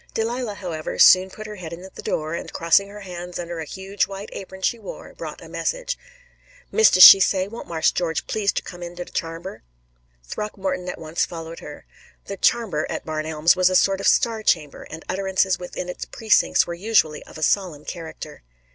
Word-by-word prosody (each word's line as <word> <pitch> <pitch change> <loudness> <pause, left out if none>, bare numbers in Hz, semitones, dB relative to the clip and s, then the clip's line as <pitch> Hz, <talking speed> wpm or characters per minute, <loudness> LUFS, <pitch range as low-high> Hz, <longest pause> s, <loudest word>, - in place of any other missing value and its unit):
Delilah, 230 -1 -2
however, 165 -5 -5
soon 185 +1 +7
put 215 +3 -10
her 210 -1 -8
head 170 -3 -8
in 170 +2 -8
the - - -9
door, 155 +1 -2
and, 170 - -5
crossing 170 +4 +3
her 205 +1 -11
hands 180 -2 -7
under 170 -1 -5
a 160 - -4
huge 190 +5 -2
white 200 +1 -8
apron 190 0 -9
she 235 - +1
wore, - - -10
brought - - -8
a - - -11
message. - - -3 0.8
"Mistis, 440 - +6
she 195 - +12
say, 190 0 +2
won't 230 +3 -9
Marse 160 -2 +1
George 165 -2 -2
please 205 -2 0
ter - - -3
come 175 -1 -10
in 175 0 -7
de 175 0 -6
charmber." 165 +3 -6 0.6
Throckmorton 190 - -4
at - - -5
once 160 +1 -2
followed 165 -1 -6
her. 150 - -11 0.4
The 200 - -6
"charmber" 190 -8 +1
at - - -5
Barn 155 -1 -3
Elms 160 +2 +3
was 185 0 +4
a 185 - 0
sort 195 +1 +3
of - - 0
star 225 -2 +3
chamber, 155 -8 0
and 160 +1 -9
utterances 190 -1 0
within 180 0 -6
its 180 - -6
precincts 220 -3 +2
were 170 - -5
usually 175 -4 +1
of - - -12
a 155 - -5
solemn 170 -5 0
character. 165 -3 -8
185 Hz, 200 wpm, -23 LUFS, 165-200 Hz, 0.8 s, she